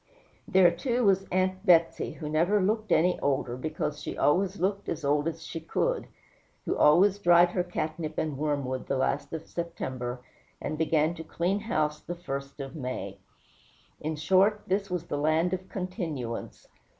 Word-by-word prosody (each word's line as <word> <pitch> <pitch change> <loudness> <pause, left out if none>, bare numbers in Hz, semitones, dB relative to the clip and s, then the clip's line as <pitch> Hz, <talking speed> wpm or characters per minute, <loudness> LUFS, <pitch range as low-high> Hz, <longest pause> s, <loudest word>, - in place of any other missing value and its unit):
There, 185 -2 +6
too, 240 +8 -1
was 195 -2 +3
Aunt 185 +1 0
Betsey, 170 -4 +3
who 155 - -7
never 170 +7 +2
looked 215 +3 0
any 180 +2 +3
older, 135 -3 0
because 150 +2 -3
she - - -5
always 190 +6 +2
looked 200 +2 -1
as 160 -3 -3
old 145 +2 +2
as 165 -1 -4
she 165 - -5
could; - - -1 0.6
who - - 0
always 185 +7 +5
dried 175 -2 +6
her 180 - 0
catnip 155 -2 -4
and 155 -3 -1
wormwood 140 -3 -2
the 135 - 0
last 140 +2 -1
of 160 -1 -5
September, 130 -7 -5 0.4
and - - -3
began 160 0 +2
to 165 -2 -8
clean 180 +5 -1
house 155 -9 -1
the 175 - -6
first 140 -5 -6
of 135 +1 -6
May. 125 -9 -5 0.8
In 155 +1 -3
short, 190 +7 +3
this 195 +1 -1
was 180 -2 -3
the 145 - -3
land 160 +4 +2
of 185 0 -4
continuance. 165 - -5
165 Hz, 165 wpm, -28 LUFS, 150-185 Hz, 0.8 s, There